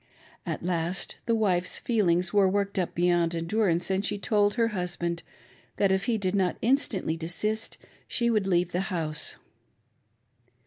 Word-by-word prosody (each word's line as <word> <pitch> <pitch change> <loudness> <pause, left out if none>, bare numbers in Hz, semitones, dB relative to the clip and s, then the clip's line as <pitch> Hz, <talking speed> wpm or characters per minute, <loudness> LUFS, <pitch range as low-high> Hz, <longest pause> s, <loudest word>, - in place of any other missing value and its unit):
At - - -3
last 175 +1 -1
the 230 - +3
wife's 185 -5 +1
feel 215 -7 +1
ings 175 +2 +1
were 200 -2 +5
worked 200 0 0
up 180 - -2
beyond 175 -1 +2
endurance, 175 +1 +1
and 190 +1 +1
she 205 0 0
told 205 +1 +2
her 230 -2 +2
husband 175 -3 -2 0.6
that, 200 -2 +3
if 190 +1 +1
he 235 -2 +1
did 190 -3 -1
not 190 -3 +1
instantly 225 - +1
desist, 195 +7 -3 0.3
she 235 - 0
would 210 -4 +1
leave 175 -1 +2
the 175 - -1
house. 160 -5 -2
190 Hz, 160 wpm, -27 LUFS, 175-210 Hz, 0.6 s, were